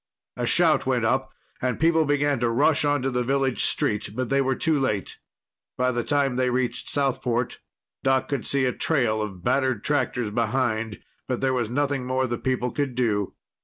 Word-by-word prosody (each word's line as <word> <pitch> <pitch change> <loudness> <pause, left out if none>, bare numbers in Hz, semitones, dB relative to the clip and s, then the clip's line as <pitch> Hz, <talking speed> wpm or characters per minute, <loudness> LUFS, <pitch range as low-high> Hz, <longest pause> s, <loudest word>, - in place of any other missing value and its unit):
A - - -2
shout - - +4
went - - +1
up, - - 0 0.3
and 125 -2 -1
people 160 0 +3
began 145 -2 +1
to 120 0 +1
rush 145 +7 +3
onto 145 -2 +1
the 125 0 0
village 135 0 0
street. 105 -1 0
But 130 0 -2
they 140 0 +3
were 135 -1 +1
too 160 -3 +1
late. 105 -7 -2 0.6
By 125 0 +2
the 120 -1 -1
time 140 -2 +1
they 130 -1 +2
reached 125 0 -2
Southport, 125 -3 -1 0.4
Doc 135 0 +2
could 140 -2 -2
see 140 -1 +1
a 125 - +1
trail 120 -9 +1
of 95 -4 -6
battered 130 -4 +1
tractors 125 -6 0
behind, 115 -1 -1 0.2
but 125 -2 -1
there 135 -1 +1
was 120 -4 -1
nothing 135 0 -1
more 130 0 +1
the 120 -2 -3
people 125 -1 -1
could 140 -4 -2
do. 105 -5 0
130 Hz, 185 wpm, -25 LUFS, 120-140 Hz, 0.6 s, shout